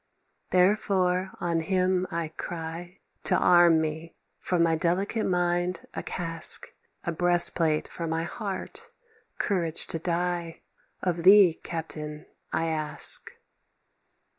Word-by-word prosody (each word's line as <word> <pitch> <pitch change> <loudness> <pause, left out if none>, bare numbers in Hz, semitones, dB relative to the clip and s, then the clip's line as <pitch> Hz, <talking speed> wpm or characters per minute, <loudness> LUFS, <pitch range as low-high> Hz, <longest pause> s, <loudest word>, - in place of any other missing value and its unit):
Therefore 185 -1 +1
on 170 -1 -1
him 185 +2 0
I 165 -2 -4
cry 170 +2 -8 0.2
To - - +2
arm 175 -2 +4
me: 160 +1 -5 0.2
"For 180 - -2
my 165 -1 +2
delicate 185 +7 -1
mind 175 -1 -1
a - - -5
casque, 165 -2 +4 0.3
A 170 - -3
breastplate 170 -2 +1
for 170 - -6
my 160 0 -2
heart, 195 +2 -7 0.5
courage 170 -5 0
to 165 - -4
die, 175 0 -3 0.4
Of 175 -2 -1
thee, 190 -1 +6
captain, 155 -2 -7 0.3
I 165 - -1
ask. 155 -2 +2
175 Hz, 115 wpm, -26 LUFS, 165-180 Hz, 0.5 s, thee